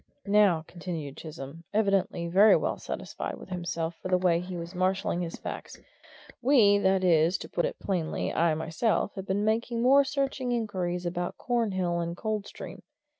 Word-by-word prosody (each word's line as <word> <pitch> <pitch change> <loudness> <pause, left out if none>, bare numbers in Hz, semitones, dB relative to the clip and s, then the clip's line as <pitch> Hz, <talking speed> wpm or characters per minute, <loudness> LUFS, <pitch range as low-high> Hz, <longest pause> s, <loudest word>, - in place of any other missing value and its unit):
"Now," 200 -6 +4
continued 165 -5 -6
Chisholm, 155 0 -8
evidently 195 -5 +1
very 195 +5 +6
well - - -1
satisfied - - -5
with - - -12
himself 170 -2 -3
for - - -4
the 185 0 +3
way 180 -2 +2
he 180 0 -6
was 170 +1 -7
marshalling 185 -1 0
his 170 -1 -4
facts, - - -7 0.6
"we 230 -6 +5
that 190 -1 +2
is, 170 0 +4
to - - -8
put 175 - -1
it - - -3
plainly, 175 -5 -2
I 165 -1 +2
myself 165 +8 0
have 195 -1 -7
been 200 +2 0
making 230 +2 0
more 275 +3 +6
searching 270 -2 -1
inquiries 185 -6 -2
about 175 0 -3
Cornhill 190 -8 0
and 170 0 -3
Coldstream. 215 -2 -5
185 Hz, 165 wpm, -28 LUFS, 170-210 Hz, 0.6 s, very